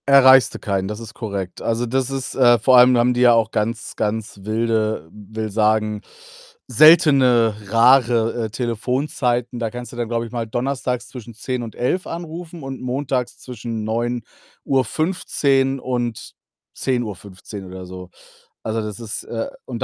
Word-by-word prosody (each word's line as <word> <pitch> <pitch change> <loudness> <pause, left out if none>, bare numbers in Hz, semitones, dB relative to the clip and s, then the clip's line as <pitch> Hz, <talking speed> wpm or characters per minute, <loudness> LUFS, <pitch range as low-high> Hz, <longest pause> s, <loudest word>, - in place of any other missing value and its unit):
Erreichst 130 -2 +7
du - - -6
keinen, 95 -2 -2
das 105 +1 -5
ist 115 -1 -9
korrekt. 100 -6 -5
Also, 115 +1 -1
das 130 +2 0
ist 135 -1 -2
äh, 120 -2 +5
vor 125 +3 +4
allem 125 0 +7
haben 120 +1 +3
die 125 - -1
ja 120 -1 +7
auch 115 -1 +2
ganz, 115 +1 -2
ganz 110 -1 -3
wilde 110 -4 -1
will 110 +1 -6
sagen, 105 0 +1 0.7
seltene, 130 -5 +5
rare, 115 0 +3
äh, - - -5
Telefonzeiten. 125 +1 -2
Da 115 -2 -2
kannst 120 +2 -8
du - - -11
dann, 120 -1 -2
glaube 115 0 -1
ich 115 - -10
mal, 120 -2 -3
Donnerstags 125 +1 -2
zwischen 120 -3 -10
10:00 125 +2 -3
und 115 -2 -7
11:00 180 +9 -1
anrufen 165 -1 -7
und 135 -1 -6
Montags 130 0 -2
zwischen 115 -2 -6
9:15 135 - -1
und 120 -3 -3 0.4
10:15 105 -5 -4
oder 95 0 -9
so. 90 0 -10 0.5
Also, 110 0 -2
das 105 -1 -6
ist 110 -2 -5
äh, 115 -1 -4 0.2
und 120 -3 -4
120 Hz, 155 wpm, -21 LUFS, 110-130 Hz, 0.7 s, Erreichst